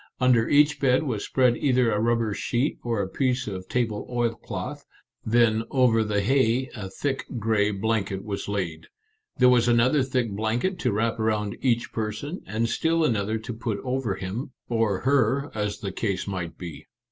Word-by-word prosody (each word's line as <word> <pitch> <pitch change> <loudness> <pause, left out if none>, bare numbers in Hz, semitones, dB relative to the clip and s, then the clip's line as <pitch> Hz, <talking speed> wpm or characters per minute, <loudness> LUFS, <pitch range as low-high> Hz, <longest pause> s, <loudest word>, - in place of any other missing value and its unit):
Under 125 -3 +3
each 150 0 +4
bed 135 +2 +3
was 120 -8 -2
spread 125 -2 +2
either 125 -4 +2
a 105 - +1
rubber 115 -1 +1
sheet 125 +7 -1
or 115 -4 0
a - - -3
piece 130 +5 0
of 95 -3 -6
table 115 -4 -1
oilcloth, 120 -2 -3 0.4
then 115 -1 +3
over 125 -4 +3
the 105 -1 0
hay 130 +2 +2
a 100 -5 -6
thick 135 +7 -3
gray 110 -2 +2
blanket 100 -2 -1
was 100 -2 -4
laid. 90 -6 -3 0.5
There 125 - +6
was 125 -1 +4
another 120 +5 +4
thick 125 -3 -1
blanket 115 - -1
to 125 -8 +1
wrap 115 +2 0
around 105 -2 0
each 120 -3 +1
person, 110 - -4
and 110 +3 0
still 165 +6 +1
another 110 -4 0
to 110 +3 -6
put 115 -2 -3
over 130 -2 -1
him, 115 +9 -5
or 115 -5 0
her, 135 +1 +2
as 105 -1 -3
the 100 - -3
case 95 -1 -2
might 90 -4 -4
be. 85 -5 -8
115 Hz, 170 wpm, -25 LUFS, 105-125 Hz, 0.5 s, There